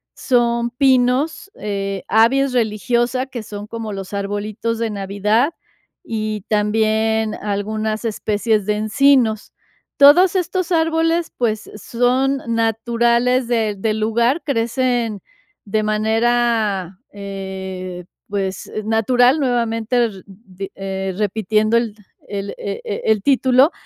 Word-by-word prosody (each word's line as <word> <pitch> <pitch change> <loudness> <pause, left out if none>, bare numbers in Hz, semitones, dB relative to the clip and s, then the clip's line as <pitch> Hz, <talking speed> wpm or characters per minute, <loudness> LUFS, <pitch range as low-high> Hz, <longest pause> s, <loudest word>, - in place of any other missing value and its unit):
son 235 -2 +1
pinos, 265 +7 +1
eh, 195 -1 -4
Abies 255 +5 +3
religiosa, 240 +3 0
que 240 -4 -6
son 205 -1 -8
como 225 -2 -5
los 195 0 -7
arbolitos 205 +3 -3
de 230 -1 -1
Navidad, 210 - 0 0.5
y 215 - -3
también 220 +1 +1
algunas 215 +2 -3
especies 215 -1 0
de 210 - +1
encinos. 220 0 +2 0.5
Todos 340 +7 +7
estos 370 0 -1
árboles, 325 0 +1
pues, 220 -3 -1
son 250 +5 +1
naturales 235 +2 +1
de 225 -3 0
del 215 +2 -1
lugar, 235 +8 +1
crecen 240 -4 -1 0.4
de 215 +1 0
manera, 220 -3 +1 0.2
eh, 190 -2 -6 0.2
pues, 195 -2 -4
natural, 245 +6 +3
nuevamente, 240 -2 +1
r 195 -4 -6
di 195 -1 -10
eh, 190 -1 -4
repitiendo 215 +2 +1
el 230 -3 -1 0.3
el, 200 0 -4
eh 200 -1 -5
eh, 200 - -4
el 220 -2 +2
título, 265 - +4
220 Hz, 110 wpm, -19 LUFS, 205-245 Hz, 0.5 s, Todos